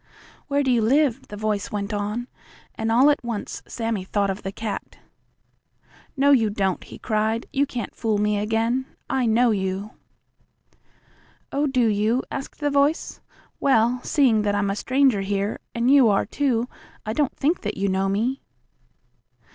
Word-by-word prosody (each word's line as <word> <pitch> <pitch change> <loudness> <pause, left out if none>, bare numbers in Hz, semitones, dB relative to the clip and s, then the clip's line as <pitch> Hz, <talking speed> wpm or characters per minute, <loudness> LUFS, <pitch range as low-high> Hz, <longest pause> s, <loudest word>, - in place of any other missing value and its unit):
"Where 285 -1 +1
do 265 - +1
you 240 -2 +3
live?" 270 +2 +2
the 210 - -8
voice 210 -2 -2
went 205 +1 -3
on, 210 +4 -2 0.5
and, 225 0 -2
all 260 +6 +6
at 290 - -2
once, 235 -3 -4
Sammie 225 -4 -3
thought 200 +1 0
of 195 - -6
the 195 - -4
cat. 215 0 -6 1.2
"No, 280 +1 +4
you 230 -6 +4
don't!" 195 -3 -1
he - - -11
cried. 220 0 -1
"You 280 +1 +2
can't 240 -5 -5
fool 220 -2 0
me 210 0 +1
again. 225 +5 0 0.2
I 260 -2 +1
know 235 +2 +4
you!" 195 +1 -2 1.6
"Oh, 290 +2 +1
do 255 -3 +2
you?" 220 +4 +1
asked 275 +2 -6
the 290 0 +1
voice. 285 +3 +1 0.4
"Well, 245 -2 +3
seeing 260 -8 +3
that 205 -1 0
I'm 200 -1 +1
a - - -2
stranger 255 -2 +2
here, 200 +1 -2 0.2
and 235 +2 +2
you 270 -5 +6
are 200 - +2
too, 245 -1 0 0.4
I 215 - -2
don't 290 +1 0
think 320 +6 +1
that - - -4
you 200 +1 0
know 190 0 +1
me." 235 +7 -1
225 Hz, 165 wpm, -23 LUFS, 205-265 Hz, 1.6 s, all